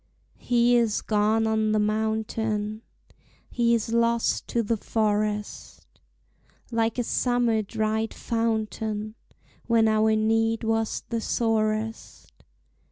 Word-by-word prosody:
He 245 0 +3
is 230 -3 +1
gone 215 +1 +2
on 220 -1 +1
the 215 - +2
mountain, 215 0 -1 0.7
He 235 -1 +2
is 225 0 -2
lost 235 0 +1
to 235 - 0
the 225 +2 0
forest, 210 -1 -2 0.9
Like 225 0 0
a 245 - +1
summer 240 -2 +1
dried 220 +1 -2
fountain 220 -2 -2 0.5
When 230 -1 +4
our 220 0 +3
need 225 +1 +1
was 225 0 -1
the 230 -1 -2
sorest. 220 -1 -2
220 Hz, 105 wpm, -25 LUFS, 215-230 Hz, 0.9 s, When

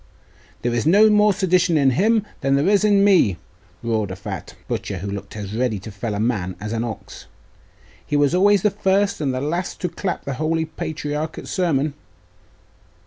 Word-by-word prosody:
'There 120 0 0
is 120 +5 0
no 210 +5 +6
more 210 0 +5
sedition 185 -3 +2
in 135 -2 +4
him 215 - +2
than 135 0 +1
there 140 +5 +2
is 205 0 +4
in 205 -2 +4
me,' 180 - +4 0.5
roared 110 -3 -1
a 95 - -5
fat 100 -1 -7
butcher, 100 - -3
who 100 +3 -5
looked 100 +1 -7
as 100 -1 -6
ready 120 -2 0
to 100 +3 -9
fell 100 +2 -4
a - - -3
man 105 -6 -1
as 105 +2 -5
an 115 0 -1
ox. 115 -2 -8 0.8
'He 150 - -1
was 145 +1 +3
always 200 +1 +4
the 210 - +3
first 200 -1 +1
and 140 -3 0
the 130 - -2
last 170 +6 -3
to 180 - -1
clap 185 +2 -4
the 140 - -3
holy 160 +4 0
patriarch 155 0 -4
at - - -8
sermon. 155 -6 0
150 Hz, 195 wpm, -21 LUFS, 115-190 Hz, 0.8 s, no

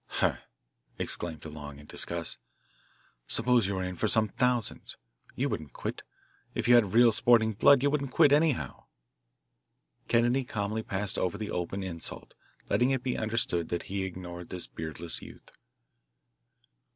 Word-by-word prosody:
"Huh!" - - 0 0.6
exclaimed 80 -3 -3
DeLong 75 -2 -8
in 75 - -13
disgust. - - -2 0.9
"Suppose 125 -5 +3
you 100 - -2
were 95 - -2
in 90 0 -4
for 110 - 0
some 110 0 +3
thousands 125 0 -1 0.4
you - - 0
wouldn't 75 -5 -5
quit. - - -5 0.5
If - - -1
you 120 - +7
had 110 -4 +4
real 120 0 +7
sporting 110 0 +4
blood 140 +5 +5
you 145 - +3
wouldn't 140 -2 -1
quit, 145 +2 +5
anyhow!" 150 -2 +1 1.2
Kennedy 120 +3 +3
calmly 110 -2 -3
passed 105 -3 -2
over 90 +2 -1
the 105 -1 -5
open 90 +3 -3
insult, 85 -4 -6 0.3
letting 125 +1 +2
it 130 -2 0
be 125 - -1
understood 110 -7 -1
that 85 - -2
he 100 -1 -1
ignored 90 -2 -7
this 90 -2 -4
beardless 80 +1 -4
youth. - - -13
105 Hz, 150 wpm, -29 LUFS, 90-120 Hz, 1.2 s, you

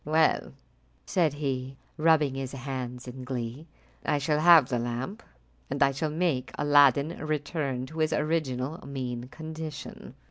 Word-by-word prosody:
"Well," 155 +1 +2 0.5
said 170 -5 +2
he, 135 -2 -3 0.2
rubbing 155 -3 +3
his 135 0 -4
hands 130 -2 -5
in 130 +1 -7
glee, 125 +3 -5 0.4
"I 150 - +1
shall 150 +1 +1
have 165 -4 +8
the 125 -2 -1
lamp, 120 - -4 0.5
and - - +2
I 140 - +4
shall 145 +3 -2
make 155 -5 0
Aladdin 145 +1 +5
return 145 -4 -2
to 160 +4 -8
his 155 0 +2
original 150 -1 -1
mean 125 -3 -4
condition." 160 +1 -8
140 Hz, 140 wpm, -28 LUFS, 130-155 Hz, 0.5 s, have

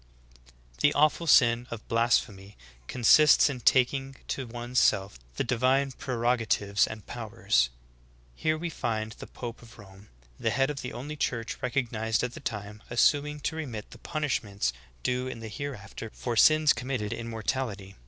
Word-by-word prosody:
20. - - -7
The 145 - +4
awful 155 +3 +3
sin 120 -4 +5
of 115 -2 -8
blasphemy 110 -4 0 0.3
consists 145 +5 +6
in 130 - -6
taking 135 +2 +2
to 130 -3 -3
one's 120 +1 -2
self 95 - +2 0.2
the - - 0
divine 130 +3 +2
prerogatives 115 -6 +1
and 110 -2 -8
powers. 110 - 0 0.6
Here 155 - 0
we 170 +1 -4
find 110 -5 -2
the - - -10
pope 120 -1 -8
of 115 -1 -15
Rome, 100 -1 -15 0.3
the - - 0
head 135 +2 +1
of 140 - -6
the 125 - -5
only 145 +5 -6
church 115 -5 -2
recognized 115 -4 -1
at 125 0 -2
the - - -8
time, 105 -5 -6
assuming 145 +4 +2
to 160 - -2
remit 125 -10 -6
the - - -12
punishments 110 - -2 0.3
due 125 +1 0
in 130 -3 -6
the 110 -1 -7
hereafter 115 -3 -7
for 120 -2 -3
sins 155 +5 +6
committed 120 -3 -3
in 115 0 -6
mortality. 110 -4 -3
120 Hz, 160 wpm, -28 LUFS, 110-135 Hz, 0.6 s, consists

